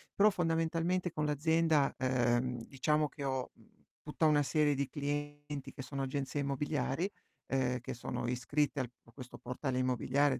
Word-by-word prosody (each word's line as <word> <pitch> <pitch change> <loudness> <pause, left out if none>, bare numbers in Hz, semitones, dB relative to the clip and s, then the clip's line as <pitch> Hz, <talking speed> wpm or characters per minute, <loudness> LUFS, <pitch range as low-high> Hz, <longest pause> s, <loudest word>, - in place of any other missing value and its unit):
Però 210 +2 +7
fondamentalmente 165 0 +1
con 150 -1 -1
l'azienda, 155 0 +3
uhm, 125 -1 +1
diciamo 150 +3 +1
che 145 - -8
ho, 130 -2 -1
mhmm, - - -25 0.2
tutta 150 +2 0
una 150 -1 +4
serie 145 +1 +3
di 140 0 0
clienti 145 -1 -4
che 135 - -7
sono 135 +1 -4
agenzie 140 +1 -2
immobiliari, 140 +4 0 0.4
uhm, 125 -1 +2
che - - -5
sono 120 +1 -3
iscritte 140 +4 0
al 125 -2 -2
qu 115 - -20
questo 125 +1 -10
portale 125 +1 -2
immobiliare, 130 +2 +2
140 Hz, 155 wpm, -34 LUFS, 130-150 Hz, 0.4 s, Però